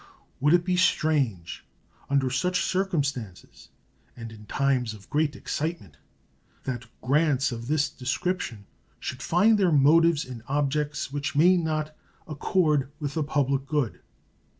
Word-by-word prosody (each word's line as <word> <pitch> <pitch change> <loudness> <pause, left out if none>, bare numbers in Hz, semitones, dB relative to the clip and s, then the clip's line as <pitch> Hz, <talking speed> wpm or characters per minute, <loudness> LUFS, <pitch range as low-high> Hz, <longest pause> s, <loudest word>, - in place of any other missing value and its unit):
Would 150 +5 +4
it 175 0 +1
be 180 -1 +1
strange, 140 - +1 0.5
under 135 -2 +1
such 180 +6 0
circumstances, 145 - -3 0.5
and 115 -1 -8
in 105 -1 -13
times 130 -5 0
of 100 -2 -16
great 150 -1 +1
excitement, 150 - -4 0.7
that 125 -2 -4
grants 140 0 +2
of 115 0 -6
this 150 +1 +2
description 130 - -3 0.3
should 130 -1 -5
find 205 - +3
their 185 -3 +3
motives 160 +2 +4
in 125 -3 -8
objects 145 0 -1
which 145 +1 -3
may 175 +5 +6
not 155 -3 -2 0.3
accord 150 -3 +1
with 145 -2 -3
the 160 - -1
public 140 -2 0
good? 145 -6 -1
145 Hz, 130 wpm, -26 LUFS, 130-160 Hz, 0.7 s, may